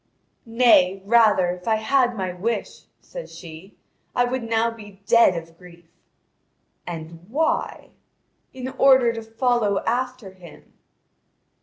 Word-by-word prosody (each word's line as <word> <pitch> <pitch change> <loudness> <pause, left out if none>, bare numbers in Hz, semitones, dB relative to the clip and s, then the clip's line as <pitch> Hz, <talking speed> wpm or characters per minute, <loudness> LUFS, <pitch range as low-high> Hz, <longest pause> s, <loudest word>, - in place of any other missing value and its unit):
"Nay, 210 -5 +3
rather, 210 -5 +4
if 180 +2 -9
I 220 - +3
had 245 +2 +1
my 185 -2 -3
wish," 220 +6 -4 0.2
says - - -10
she, 170 +3 -12 0.4
"I 245 - +3
would 255 +1 -3
now 230 0 0
be 205 -3 -14
dead 230 -5 +4
of 165 0 -10
grief." 175 -2 -16 1.0
"And 165 0 -8
why?" 315 +6 -2 0.6
"In 260 0 -6
order 260 -3 +5
to 225 - -6
follow 225 -2 0
after 250 -3 -3
him." 180 -3 -16
220 Hz, 125 wpm, -22 LUFS, 180-245 Hz, 1.0 s, order